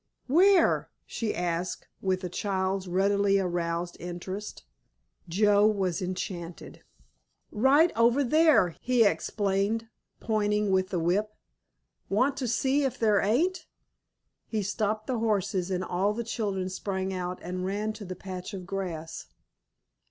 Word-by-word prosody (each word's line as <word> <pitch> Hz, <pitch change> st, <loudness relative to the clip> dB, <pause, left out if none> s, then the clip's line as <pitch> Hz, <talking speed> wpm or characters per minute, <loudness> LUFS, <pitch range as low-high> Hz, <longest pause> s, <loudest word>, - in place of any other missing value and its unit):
"Where?" 360 Hz, +6 st, +4 dB, 0.2 s
she 225 Hz, -3 st, -3 dB
asked, 175 Hz, 0 st, -2 dB
with 190 Hz, 0 st, 0 dB
a -, -, -1 dB
child's 190 Hz, +1 st, -2 dB
readily 200 Hz, +2 st, +2 dB
aroused 175 Hz, -2 st, -2 dB
interest. 180 Hz, -, -6 dB, 0.7 s
Joe 205 Hz, +3 st, +4 dB
was 195 Hz, -5 st, 0 dB
enchanted. 180 Hz, -2 st, -6 dB, 0.7 s
"Right 280 Hz, +9 st, +4 dB
over 235 Hz, +5 st, +4 dB
there," 305 Hz, -, +4 dB
he 250 Hz, -2 st, +3 dB
explained, 205 Hz, +2 st, 0 dB, 0.3 s
pointing 210 Hz, -2 st, 0 dB
with 185 Hz, 0 st, +2 dB
the 185 Hz, -, -2 dB
whip. 200 Hz, +6 st, 0 dB, 0.7 s
"Want 255 Hz, +8 st, +2 dB
to 260 Hz, -3 st, -2 dB
see 265 Hz, +5 st, +1 dB
if 270 Hz, -, -1 dB
there 215 Hz, -3 st, +3 dB
ain't?" 310 Hz, -, +1 dB, 0.8 s
He 215 Hz, -2 st, -2 dB
stopped 215 Hz, +2 st, -1 dB
the 250 Hz, -3 st, -2 dB
horses 195 Hz, -4 st, 0 dB
and 185 Hz, -1 st, -1 dB
all 190 Hz, +3 st, 0 dB
the 235 Hz, +2 st, -3 dB
children 205 Hz, -5 st, -2 dB
sprang 190 Hz, 0 st, -3 dB
out 180 Hz, 0 st, -3 dB
and 180 Hz, +1 st, -4 dB
ran 205 Hz, +3 st, -2 dB
to 215 Hz, -1 st, -9 dB
the 185 Hz, -1 st, -6 dB
patch 185 Hz, +2 st, -7 dB
of 185 Hz, -2 st, -7 dB
grass. 170 Hz, -4 st, -5 dB
200 Hz, 130 wpm, -28 LUFS, 185-220 Hz, 0.8 s, Where